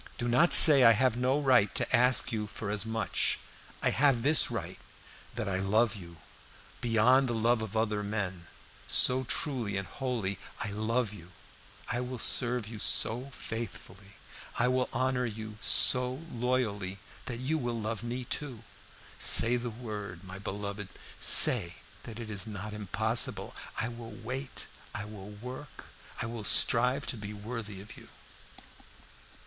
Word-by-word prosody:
Do 120 - -3
not 130 +9 +3
say 145 -5 +10
I 115 - +8
have 125 +1 +1
no 130 +3 0
right 125 -8 +3
to - - +2
ask 125 +1 +4
you 105 -2 -3
for 105 -1 -6
as 105 +1 -1
much. 110 -2 -1 0.5
I - - +2
have 135 -4 +2
this 150 +3 +5
right, - - -6 0.6
that 110 -3 -4
I 95 -1 -1
love 110 +3 +1
you 85 -4 -12 0.6
beyond 120 +3 +3
the 120 - -2
love 115 +1 +1
of 110 0 -5
other 105 -2 -1
men, 95 -4 -4 0.4
so 130 +1 +5
truly 120 -9 -2
and 95 - -4
wholly 115 -7 -4 0.2
I 105 - -3
love 110 +2 -2
you; 90 -3 -13 0.6
I 125 0 -2
will 125 0 -5
serve 120 -1 +1
you 110 -1 -9
so 120 +6 +1
faithfully, 105 -4 -8 0.4
I 120 - +2
will 130 0 0
honor 125 0 -1
you 110 -1 -8
so 125 +4 +5
loyally 115 -6 -2 0.3
that 120 -3 -4
you 150 +5 -1
will 120 -3 -3
love 110 0 -4
me 120 +1 -5
too. 125 -4 -6 0.6
Say 120 +2 +2
the 120 0 -3
word, 105 -6 -8
my 95 0 -10
beloved, 100 0 -6 0.3
say 85 +1 +3 0.3
that 115 -1 -9
it 110 -2 -7
is 100 0 -4
not 105 0 -7
impossible! 105 -5 0 0.2
I 110 - -1
will 120 -1 -9
wait 125 +5 -7 0.3
I 105 - -4
will 105 -2 -10
work 125 +7 -10 0.3
I - - -1
will 115 -1 -6
strive 125 +6 +3
to 125 - -5
be 105 0 -7
worthy 105 -2 -7
of 105 +3 -12
you." - - -15
115 Hz, 155 wpm, -29 LUFS, 105-125 Hz, 0.6 s, say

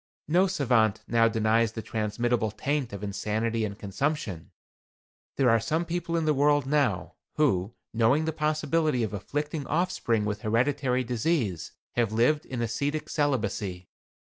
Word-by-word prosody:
No 180 +5 +4
savant 120 - +2
now 115 -1 +4
denies 110 0 +2
the 110 - -5
transmittable 110 +2 -1
taint 140 +4 -2
of 100 0 -7
insanity 110 +3 -1
and 100 -2 -3
consumption. 105 - -3 0.9
There 135 - +2
are 115 - +4
some 160 +9 -1
people 170 0 -2
in 165 - 0
the 155 - +3
world 145 0 +3
now, 145 -1 0 0.2
who, 115 -8 +1 0.2
knowing 120 +7 +3
the 160 - -1
possibility 155 -3 +1
of 110 - -3
afflicting 145 - -3
offspring 150 - 0
with 105 0 -3
hereditary 125 +3 +1
disease, 120 - -1 0.2
have 115 -3 0
lived 125 +8 +2
in 120 -2 -3
ascetic 140 +7 -2
celibacy. 105 - -1
120 Hz, 145 wpm, -27 LUFS, 110-150 Hz, 0.9 s, No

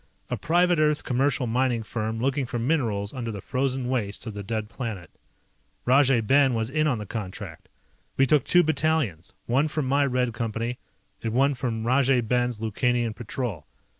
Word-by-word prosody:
A - - +1
private 175 +1 +2
Earth 150 -1 +2
commercial 130 0 +1
mining 120 0 0
firm 110 0 -3
looking 135 +1 0
for 120 - -3
minerals 115 -6 0
under 120 -4 -4
the 100 - -6
frozen 130 +3 -1
wastes 110 -5 -2
of 110 - -5
the 100 - -6
dead 110 +1 -3
planet. 110 - -6 0.7
Rajay 130 -1 +4
Ben 135 +3 +3
was 115 +2 -2
in 155 +1 +2
on 130 -5 +1
the 105 - -6
contract. 105 -3 -7 0.5
We 135 - +5
took 140 0 +3
two 175 0 +4
battalions, 155 - 0
one 135 +6 +2
from 155 -2 -2
my 140 +2 +2
Red 125 -2 0
Company, 115 +1 -3 0.4
and 115 -1 -3
one 135 +3 +3
from 115 -3 -3
Rajay 130 0 +3
Ben's 120 0 0
Lukanian 115 +1 0
Patrol. 115 - -5
125 Hz, 170 wpm, -25 LUFS, 115-135 Hz, 0.7 s, We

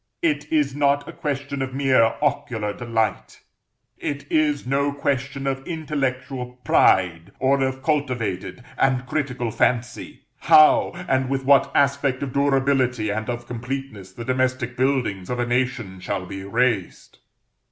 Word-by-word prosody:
It 150 -2 0
is 145 -4 +1
not 145 0 +1
a - - -6
question 140 -1 -4
of 130 -1 -4
mere 130 -5 +3
ocular 125 -8 -1
delight, 115 -1 -2 0.6
it 145 -1 -4
is 150 -3 +1
no 140 +2 +1
question 140 -1 -2
of 135 -1 -1
intellectual 135 -6 -3
pride, 90 -1 +3
or 135 +1 +2
of 130 0 -2
cultivated 125 - -2 0.2
and 130 -1 +2
critical 125 -4 -2
fancy, 120 +2 -1 0.2
how, 155 0 +6 0.2
and 130 -1 +1
with 135 -1 -2
what 140 -1 +4
aspect 140 -1 +2
of 130 -3 -5
durability 135 -5 +1
and 110 +3 -3
of 120 0 -4
completeness, 120 -5 -6
the 115 +5 -8
domestic 130 -1 -1
buildings 125 -8 0
of 125 - -2
a 120 - 0
nation 120 -6 -1
shall 90 0 -3
be 95 +1 -7
raised. 105 -1 -1
130 Hz, 140 wpm, -23 LUFS, 120-140 Hz, 0.6 s, how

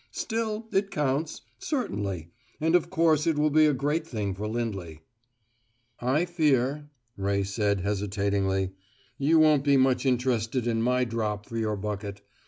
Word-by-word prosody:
Still, 225 -1 -3
it 195 +1 +1
counts 150 +1 -1 0.2
certainly; 100 - -3 0.3
and 160 +2 +1
of 175 - +2
course 160 -2 +2
it 160 -2 +2
will 150 0 +2
be 155 +1 +5
a - - +4
great 150 +4 -1
thing 105 -8 -3
for 105 +3 -4
Lindley." 100 -9 -4 1.0
"I 135 +8 +1
fear," 145 -4 +1 0.3
Ray 100 0 0
said 100 0 0
hesitatingly, 100 -1 0 0.5
"you 150 +4 +4
won't 155 -3 +5
be 140 -1 +4
much 130 0 +2
interested 125 -1 0
in 115 -1 0
my 125 +2 +2
drop 105 -3 -2
for 115 - -9
your 110 -2 -1
bucket. 100 0 -5
125 Hz, 150 wpm, -27 LUFS, 100-150 Hz, 1.0 s, be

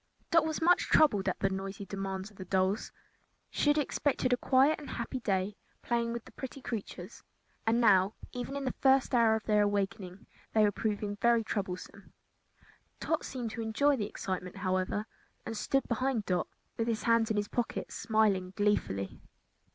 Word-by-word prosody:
Dot 330 -1 +5
was 315 0 -2
much 355 +2 +4
troubled 210 -11 +4
at - - -4
the 195 - +3
noisy 195 +1 -5
demands 195 +1 -4
of 205 - -21
the 185 - -7
dolls. 190 +4 0 0.6
She 295 - +1
had 295 - +4
expected 275 -3 +1
a - - +3
quiet 270 +5 +3
and 295 - -9
happy 245 +2 -4
day 195 -2 -1 0.3
playing 235 -1 0
with 235 -1 -5
these - - -15
pretty 265 +1 -7
creatures, 220 -5 -6 0.5
and 230 +1 +3
now, 200 -3 +4 0.2
even 250 +2 -5
in 280 -1 -3
the 255 - 0
first 265 -1 +4
hour 230 -2 +5
of 220 - -3
their 210 -1 +3
awakening, 200 -2 -2 0.3
they 220 - +5
were 205 - +4
proving 205 0 -2
very 235 0 +3
troublesome. 200 -1 -5 0.9
Tot 320 - -1
seemed 245 -4 -4
to 230 +1 -5
enjoy 250 +6 +2
the 210 -5 -3
excitement, 185 -3 -5
however, 185 +2 -1 0.4
and 225 - -4
stood 270 +5 0
behind 245 -2 0
Dot, 180 -1 0 0.3
with 230 - -1
his 225 -2 -1
hands 230 -1 +3
in 215 - 0
his 205 0 0
pockets, 240 +1 -3
smiling 205 -4 +1
gleefully. 145 - 0
220 Hz, 175 wpm, -31 LUFS, 195-245 Hz, 0.9 s, Dot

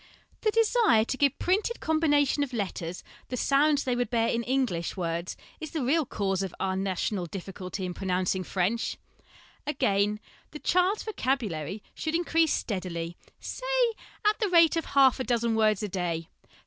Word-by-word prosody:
The 435 - +2
desire 445 - +4
to 265 - -2
give 280 0 +2
printed 410 +6 +1
combina 310 -3 +3
tions 285 +2 +1
of 260 - -14
letters 185 -5 -4 0.2
the 250 - -4
sounds 285 +3 +3
they 250 -2 0
would 245 0 -1
bear 230 -2 +2
in 235 - 0
English 240 -11 -1
words 170 0 -3 0.2
is 315 - -6
the 315 -5 -2
real 290 +3 +2
cause 195 -4 -1
of 190 -3 -4
our 190 -1 0
national 190 -1 -1
difficulty 190 +1 -6
in 180 - -3
pronouncing 185 0 -1
French. 195 +6 -1 0.7
Again, 210 -7 +1 0.3
the 300 - -8
child's 365 +6 +2
vocabulary 215 - -2
should 315 0 -3
increase 330 -2 +2
steadily, 175 -4 -3 0.2
say, - - 0 0.3
at 420 0 +3
the 420 -4 +1
rate 335 -2 +6
of 330 - -1
half 270 -2 +4
a - - 0
dozen 235 -1 +1
words 215 -2 +2
a - - 0
day. 175 -4 -2
235 Hz, 165 wpm, -28 LUFS, 190-310 Hz, 0.7 s, rate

